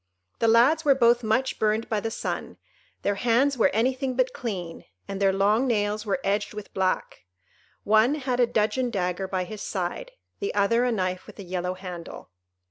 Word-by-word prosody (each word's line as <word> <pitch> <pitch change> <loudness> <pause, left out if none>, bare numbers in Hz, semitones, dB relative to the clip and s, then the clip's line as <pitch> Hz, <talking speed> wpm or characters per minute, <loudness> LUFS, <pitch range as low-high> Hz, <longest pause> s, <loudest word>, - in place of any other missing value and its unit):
The 230 - +2
lads 250 +8 +5
were 280 -2 +5
both 240 -1 +4
much 240 +4 0
burned 215 +1 +1
by 215 - 0
the 225 - -3
sun, - - -4 0.5
their 205 - +1
hands 245 +6 +2
were 235 - +3
anything 255 +4 0
but 255 0 +1
clean, 185 -8 -5 0.2
and 195 0 -5
their 195 -1 +4
long 205 +6 +2
nails 210 -2 0
were 210 - 0
edged 205 +1 -1
with 210 -1 -8
black; 185 - -1 0.6
one 220 +7 +4
had 255 -4 -2
a 245 - +4
dudgeon 235 +4 0
dagger 190 -3 -2
by 185 -1 -1
his 210 +3 -8
side; 195 - -3 0.3
the 405 - -3
other 230 +4 +3
a 250 - +1
knife 185 -4 -2
with - - -13
a 200 - -7
yellow 180 0 -3
handle. 180 - -9
215 Hz, 185 wpm, -26 LUFS, 195-245 Hz, 0.6 s, lads